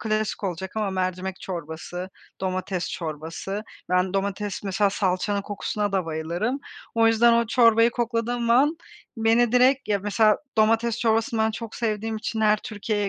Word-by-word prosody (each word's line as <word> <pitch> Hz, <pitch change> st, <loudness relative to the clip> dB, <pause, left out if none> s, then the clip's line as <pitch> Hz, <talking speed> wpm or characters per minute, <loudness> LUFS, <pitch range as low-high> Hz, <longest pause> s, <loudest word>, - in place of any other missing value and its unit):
klasik 215 Hz, -1 st, -1 dB
olacak 190 Hz, 0 st, -4 dB
ama 210 Hz, -2 st, 0 dB
mercimek 185 Hz, 0 st, -3 dB
çorbası, 175 Hz, +1 st, -6 dB, 0.3 s
domates 185 Hz, -1 st, -2 dB
çorbası. 165 Hz, +6 st, -5 dB, 0.3 s
Ben, 180 Hz, +1 st, +2 dB
domates 200 Hz, +1 st, -2 dB
Mesela 195 Hz, +1 st, +1 dB
salçanın 200 Hz, +1 st, 0 dB
kokusuna 205 Hz, 0 st, -3 dB
da 185 Hz, -3 st, 0 dB
bayılırım. 170 Hz, -, -2 dB, 0.3 s
O 230 Hz, 0 st, +4 dB
yüzden 225 Hz, +1 st, +5 dB
o 235 Hz, 0 st, +3 dB
çorbayı 230 Hz, 0 st, +5 dB
kokladığım 235 Hz, 0 st, -1 dB
an 290 Hz, +7 st, +4 dB, 0.4 s
beni 225 Hz, +1 st, +3 dB
direkt 255 Hz, 0 st, +4 dB
Ya, 205 Hz, -1 st, +2 dB
mesela 210 Hz, +2 st, +3 dB, 0.2 s
domates 225 Hz, +1 st, +3 dB
çorbasını 225 Hz, 0 st, +1 dB
ben 220 Hz, -, +3 dB
çok 225 Hz, 0 st, -7 dB
sevdiğim 220 Hz, -1 st, -2 dB
için 220 Hz, 0 st, -3 dB
her 215 Hz, 0 st, +4 dB
Türkiye'ye 210 Hz, -2 st, -2 dB
210 Hz, 145 wpm, -25 LUFS, 190-230 Hz, 0.4 s, yüzden